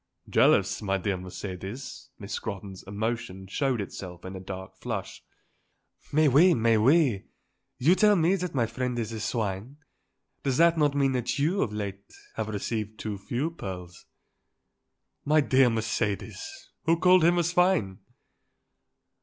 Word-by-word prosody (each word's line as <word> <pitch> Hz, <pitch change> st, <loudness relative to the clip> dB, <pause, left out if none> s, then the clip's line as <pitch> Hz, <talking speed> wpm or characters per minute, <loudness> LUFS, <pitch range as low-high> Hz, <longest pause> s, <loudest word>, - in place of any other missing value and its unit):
"Jealous, -, -, +3 dB
my 95 Hz, -2 st, 0 dB
dear 95 Hz, +1 st, -1 dB
Mercedes?" 95 Hz, +8 st, -7 dB
Miss 100 Hz, 0 st, -8 dB
Scrotton's 100 Hz, -3 st, -5 dB
emotion 105 Hz, -2 st, -3 dB
showed 130 Hz, +5 st, -1 dB
itself 95 Hz, -3 st, -7 dB
in 95 Hz, +1 st, -6 dB
a -, -, -6 dB
dark 95 Hz, 0 st, -8 dB
flush. -, -, -5 dB, 0.9 s
"Mais 155 Hz, +1 st, +4 dB
oui; 160 Hz, +7 st, +6 dB
mais 115 Hz, -2 st, +3 dB
oui; 130 Hz, -, +3 dB, 0.5 s
you 155 Hz, +8 st, +4 dB
tell 210 Hz, +1 st, +5 dB
me 170 Hz, +1 st, +3 dB
that 180 Hz, -5 st, -3 dB
my 120 Hz, -3 st, +2 dB
friend 125 Hz, +2 st, -3 dB
is 115 Hz, -1 st, -3 dB
a 110 Hz, -, -5 dB
swine. 110 Hz, +3 st, -3 dB, 0.6 s
Does 135 Hz, -2 st, 0 dB
that 170 Hz, 0 st, +5 dB
not 145 Hz, -3 st, +2 dB
mean 140 Hz, -1 st, +2 dB
that 125 Hz, +1 st, -1 dB
you, 165 Hz, +8 st, +1 dB
of 110 Hz, -, 0 dB
late, 100 Hz, -2 st, -6 dB, 0.2 s
have 110 Hz, -1 st, -3 dB
received 110 Hz, +1 st, -3 dB
too 105 Hz, -3 st, -5 dB
few 130 Hz, +10 st, -2 dB
pearls?" 90 Hz, -, -8 dB, 1.2 s
"My 155 Hz, +2 st, +3 dB
dear 135 Hz, -3 st, +4 dB
Mercedes! 115 Hz, -, -3 dB
Who 165 Hz, +1 st, +3 dB
called 180 Hz, 0 st, +5 dB
him 175 Hz, +2 st, +4 dB
a 175 Hz, -, +3 dB
swine?" 175 Hz, -, +2 dB
115 Hz, 145 wpm, -27 LUFS, 100-155 Hz, 1.2 s, oui